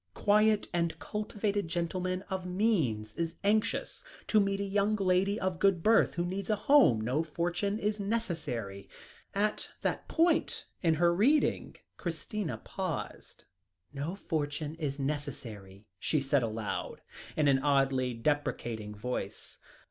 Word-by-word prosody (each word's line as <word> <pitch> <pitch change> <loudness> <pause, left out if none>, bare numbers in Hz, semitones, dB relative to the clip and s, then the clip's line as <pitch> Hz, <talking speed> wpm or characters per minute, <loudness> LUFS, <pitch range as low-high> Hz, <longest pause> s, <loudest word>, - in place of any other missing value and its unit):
"Quiet 210 0 +3
and 170 -2 0
cultivated 210 -2 -2
gentleman 185 +2 -2
of 190 -2 -4
means 175 - 0
is 165 +3 -3
anxious 215 - +1 0.3
to 215 - +5
meet 195 -1 +1
a - - 0
young 200 +2 +1
lady 195 +1 +2
of 185 -2 -1
good 185 -4 +3
birth, 225 +1 +4
who 175 0 0
needs 190 +3 -4
a 215 - +3
home. 205 - +5
No 125 +7 +1
fortune 175 +5 -1
is 210 0 -1
necessary." 160 - -3 0.5
At 210 +1 0
that - - -1
point 330 -1 +2 0.2
in 165 -3 +3
her 170 +2 +4
reading, 265 - +2 0.2
Christina 170 +2 -3
paused. 185 -5 -5 0.5
"No 145 +6 -3
fortune 150 -4 -2
is 140 -3 -2
necessary," 120 -9 -5
she 155 - +1
said 140 0 +2
aloud, 110 -2 -3 0.4
in 150 -2 +3
an 135 -1 +5
oddly 135 -3 +2
deprecating 115 -5 -2
voice. 125 +4 -5
170 Hz, 135 wpm, -31 LUFS, 140-200 Hz, 0.5 s, to